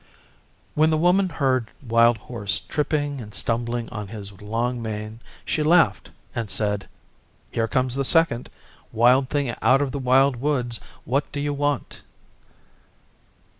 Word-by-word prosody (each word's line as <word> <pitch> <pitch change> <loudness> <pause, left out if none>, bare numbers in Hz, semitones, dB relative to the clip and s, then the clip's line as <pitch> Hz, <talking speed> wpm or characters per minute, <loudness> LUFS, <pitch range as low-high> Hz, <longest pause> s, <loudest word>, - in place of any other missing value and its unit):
When 155 +1 +3
the 155 - +2
Woman 180 +4 +3
heard 130 -7 0 0.2
Wild 115 0 +4
Horse 105 -2 -3
tripping 145 -2 -2
and 105 -2 -6
stumbling 120 0 0
on 105 -3 -6
his 100 -1 -8
long 115 +4 -2
mane, 110 0 -5 0.3
she 155 - -1
laughed 155 - +3 0.2
and 115 -3 -3
said, 105 -2 0 0.6
'Here 115 -1 0
comes 130 0 +1
the 135 +1 0
second. 150 -5 +3 0.4
Wild 125 +4 +4
Thing 140 -5 -1
out 135 +1 +5
of 140 -2 -1
the 140 - -4
Wild 130 +1 +3
Woods 125 -3 -1 0.3
what 135 +4 -1
do 145 - -4
you 145 0 -1
want? 145 -2 -2
125 Hz, 140 wpm, -23 LUFS, 115-145 Hz, 0.6 s, out